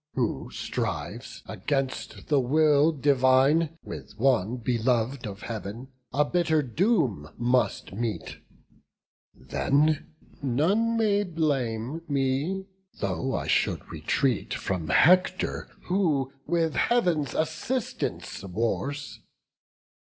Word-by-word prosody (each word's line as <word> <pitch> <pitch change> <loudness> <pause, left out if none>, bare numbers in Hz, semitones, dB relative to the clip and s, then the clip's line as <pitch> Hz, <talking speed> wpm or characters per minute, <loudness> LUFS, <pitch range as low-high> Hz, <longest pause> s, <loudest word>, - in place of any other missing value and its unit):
Who 115 - -1
strives, - - -4
against 135 -2 -3
the 145 -2 +3
will 150 +3 +4
divine, 140 +3 +3
with - - -9
one 120 -2 +2
Belov'd 120 +1 0
of 100 +1 -8
Heav'n, 115 +3 -6 0.2
a 150 +3 +2
bitter 160 -2 +2
doom 130 - +1
must 120 -5 +1
meet. 115 +1 -3 1.0
Then 145 - +1 0.3
none 190 - +2
may 205 -2 +3
blame 145 - -1
me, 140 +7 0 0.3
though 95 -5 -1
I - - -2
should - - 0
retreat 130 -6 0
From 90 -4 -3
Hector, 185 - +3 0.2
who 155 -8 +1
with 165 -2 +1
Heav'n's 175 - +1
assistance 160 +11 -2
wars. 115 +9 -2
140 Hz, 95 wpm, -27 LUFS, 120-160 Hz, 1.0 s, will